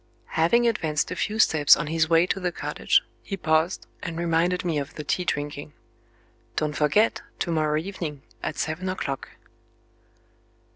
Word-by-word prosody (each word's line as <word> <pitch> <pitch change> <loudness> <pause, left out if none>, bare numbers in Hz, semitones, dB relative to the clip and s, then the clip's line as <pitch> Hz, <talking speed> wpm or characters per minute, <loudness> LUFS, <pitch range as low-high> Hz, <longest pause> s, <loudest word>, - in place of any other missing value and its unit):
Having 235 +10 +3
advanced 160 -9 0
a - - -2
few 210 +4 -2
steps 155 -9 +6
on - - -2
his 160 +1 +1
way 165 +1 +5
to 195 - -1
the 180 -1 -1
cottage, - - +1 0.2
he 195 - -5
paused, 160 +1 +1 0.2
and 170 -4 -5
reminded 170 +2 +1
me 160 -4 +1
of 140 - -6
the 150 - -5
tea 180 +5 0
drinking: 145 -2 -3 0.8
"Don't 150 -1 0
forget 155 +10 +2 0.2
to 170 - -2
morrow 155 -2 +1
evening, 155 -5 -5 0.2
at - - -4
seven 165 +5 -2
o'clock." 140 -7 -4
165 Hz, 155 wpm, -25 LUFS, 150-180 Hz, 0.8 s, steps